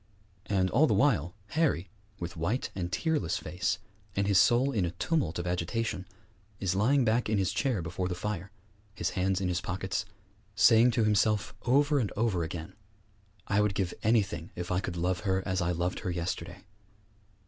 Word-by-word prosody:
And 95 -2 +1
all 145 +8 +5
the - - +2
while 100 - +2
Harry, 150 - +1 0.3
with 85 0 -5
white 90 +10 -1
and 90 -2 -4
tearless 150 - 0
face, 90 +2 -2 0.4
and 100 - +1
his 100 -2 +4
soul 125 +7 +4
in 110 -8 0
a 85 - 0
tumult 90 - -1
of 85 - -3
agitation, 90 +3 -2 0.5
is 95 -2 0
lying 125 +7 +3
back 115 +1 +1
in 110 - +2
his 95 -2 +1
chair 125 - 0
before 90 +3 -3
the 90 - -3
fire, 100 0 -4 0.5
his - - -1
hands 95 0 0
in 95 - -1
his 90 -1 -1
pockets, 95 +3 -2 0.5
saying 115 +3 +6
to 115 -1 +1
himself 105 -1 +2
over 145 +3 +4
and 110 -6 -1
over 110 -6 +1
again, 80 0 -5 0.7
'I 100 - +2
would 105 -2 +1
give 95 -3 -1
anything 100 -7 +1
if 90 0 -5
I 90 - +2
could 90 -2 -4
love 90 +1 0
her 95 -2 0
as 95 -1 0
I 90 0 +1
loved 85 +1 -1
her 95 - -4
yesterday!' 90 +1 -4
95 Hz, 180 wpm, -30 LUFS, 90-110 Hz, 0.7 s, saying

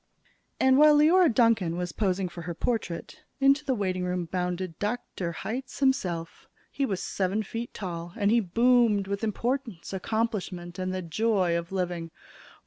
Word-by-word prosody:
And, 260 +1 +5
while 300 0 +7
Leora 325 +3 +5
Duncan 225 -8 +2
was 180 -1 -3
posing 190 -2 0
for 175 0 -8
her 170 0 -5
portrait, 225 - -3 0.2
into 275 +2 +4
the 265 -3 0
waitingroom 180 -4 -2
bounded 180 -2 -3
Dr. 205 -5 -3
Hitz 250 +10 -5
himself. 180 - -1 0.2
He 275 - -1
was 195 -5 -2
seven 195 +3 -1
feet 230 +3 -5
tall, 175 -3 -6
and 205 -2 +2
he 235 - +5
boomed 230 0 +3
with 200 +2 -4
importance, 230 -3 -2
accomplishments, 190 -4 -3
and 185 0 -2
the 185 0 -3
joy 185 0 +1
of 170 +1 -3
living. 175 -3 -2
195 Hz, 150 wpm, -27 LUFS, 180-235 Hz, 0.2 s, while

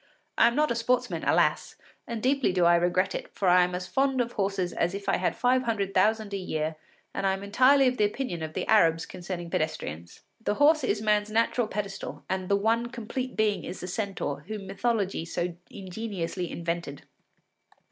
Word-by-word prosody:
I - - +6
am 235 - 0
not 300 -2 +2
a - - 0
sportsman, 245 +2 0
alas! - - +2 0.3
and 230 -2 -5
deeply 275 -3 +2
do 180 -1 +2
I 170 - +6
regret 180 +2 +1
it, - - -5
for 195 - 0
I 180 0 +6
am 180 0 -1
as 180 0 -4
fond 270 +5 +1
of 240 -1 0
horses 195 -4 -1
as 175 +3 0
if 200 0 -7
I - - +3
had 185 - 0
five 255 +1 +2
hundred 210 -5 -1
thousand 215 +2 +2
a - - 0
year, 155 -4 -2 0.4
and 195 - -1
I 190 - +2
am 195 +1 -5
entirely 260 +7 +5
of 250 0 0
the - - +2
opinion 205 -5 -3
of 155 0 -5
the - - -2
Arabs 165 -6 +4
concerning 175 -1 -6
pedestrians. 85 - -3 0.2
The 205 - 0
horse 305 +4 +4
is 210 +1 0
man’s 210 -1 +2
natural 230 +1 +1
pedestal, 200 -2 -5
and 185 -1 -3
the 200 - +4
one 225 +4 +1
complete 245 +2 -5
being 210 -4 +1
is 180 - -6
the 180 - -6
centaur, 190 -7 -3
whom 210 -2 -5
mythology 195 -2 -1
so 175 +1 -3
ingeniously 185 -3 -5
invented. 170 -4 -4
200 Hz, 200 wpm, -27 LUFS, 180-230 Hz, 0.4 s, I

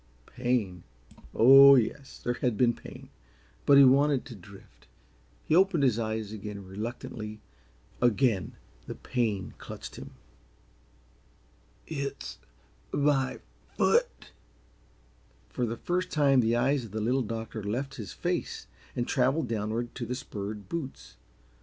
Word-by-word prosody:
Pain? 120 -8 -2 0.5
Oh, 135 +3 +9
yes, 135 +3 -1
there 120 - -2
had 120 -2 -1
been 120 0 +3
pain - - -12 0.6
but 140 - +7
he 140 - +9
wanted 135 +1 +4
to 120 - -9
drift. 95 - -16 0.6
He 155 - +2
opened 185 -4 +4
his 120 -4 +2
eyes 110 -2 -3
again 105 -2 -7
reluctantly; 110 +1 -6 0.6
again 120 -4 +2 0.3
the - - -6
pain 110 -7 -2
clutched - - -9
him. - - -10 1.7
"It's 140 -3 -5 0.5
my 140 -2 +1 0.4
foot." - - +1 1.2
For 125 - -2
the 115 +1 -4
first 180 +5 -2
time 140 -3 +3
the 115 -1 +2
eyes 135 +2 +1
of 110 - -10
the 110 - -2
Little 125 +5 +1
Doctor 115 -1 -5
left 130 +7 -3
his 100 - -8
face - - -3 0.3
and 120 - -2
traveled 135 +2 +1
downward 115 +2 -2
to 120 -3 -5
the 125 - -3
spurred 105 -5 -6
boots. 145 +1 -6
120 Hz, 130 wpm, -28 LUFS, 110-135 Hz, 1.7 s, Oh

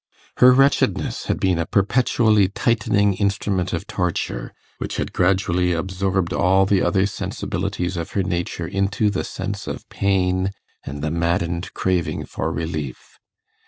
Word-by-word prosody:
Her 125 0 +8
wretchedness 135 +2 +2
had - - -1
been 90 -3 +1
a 85 - -1
perpetually 105 -1 +3
tightening 105 -1 +1
instrument 100 -1 -1
of 85 - -3
torture, 90 -3 -2 0.3
which - - -4
had - - -3
gradually 90 -1 +2
absorbed 95 +1 -1
all 95 +2 +3
the 95 0 +2
other 95 -1 +2
sensibilities 95 -2 -3
of 85 - -5
her 100 - +1
nature 85 -1 -2
into 100 +3 0
the 95 - -2
sense - - -5
of - - -6
pain 95 -1 +1 0.3
and 70 +1 -6
the 75 - -1
maddened 85 +1 -1
craving 90 -2 -1
for - - -3
relief. 80 -5 -5
95 Hz, 140 wpm, -22 LUFS, 85-100 Hz, 0.3 s, Her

